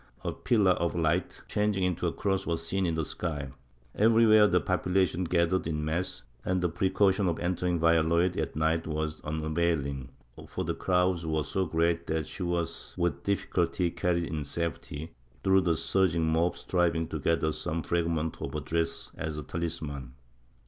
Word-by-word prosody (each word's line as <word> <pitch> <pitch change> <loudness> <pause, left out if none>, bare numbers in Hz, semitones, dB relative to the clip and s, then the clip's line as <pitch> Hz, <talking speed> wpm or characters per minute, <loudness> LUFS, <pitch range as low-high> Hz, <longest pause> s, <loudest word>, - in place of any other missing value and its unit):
A - - -1
pillar 105 -6 +2
of 85 -1 0
hght, 85 +2 -1
changing 105 -2 0
into 90 -2 0
a - - 0
cross, 95 -1 -1
was 85 -1 -1
seen 95 +1 0
in 85 - 0
the 80 -1 -1
sky; 70 -3 -4 0.4
everywhere 110 -1 +6
the 90 -2 +3
population 90 -1 +1
gathered 85 +1 +1
in 75 -1 -2
mass, 85 +4 -2 0.2
and 95 0 0
the 90 -1 +1
precaution 95 +3 +2
of 85 - 0
entering 90 0 0
Valladolid 85 +2 +3
at 80 -5 -2
night 80 +1 +1
was 80 0 -3
unavailing, 80 -3 -1 0.4
for - - -3
the - - -1
crowds 90 -1 +1
were 80 -1 0
so 95 +5 -1
great 85 +1 +1
that 80 -1 -1
she 95 - -8
was 85 -2 -3
with 85 -1 0
difficulty 90 -3 0
carried 85 0 0
in 80 -3 -3
safety, 80 0 -4 0.3
through 95 0 +5
the 85 -3 +1
surging 85 -1 +2
mob 85 +2 +1
striving 85 -2 +1
to 80 - -3
gather 80 +1 +1
some 80 +1 -3
fragment 80 -2 -1
of 70 - -4
her - - 0
dress 80 +2 -2
as 80 -2 -4
a 75 - -4
talisman. 75 -6 -4
85 Hz, 170 wpm, -29 LUFS, 80-90 Hz, 0.4 s, everywhere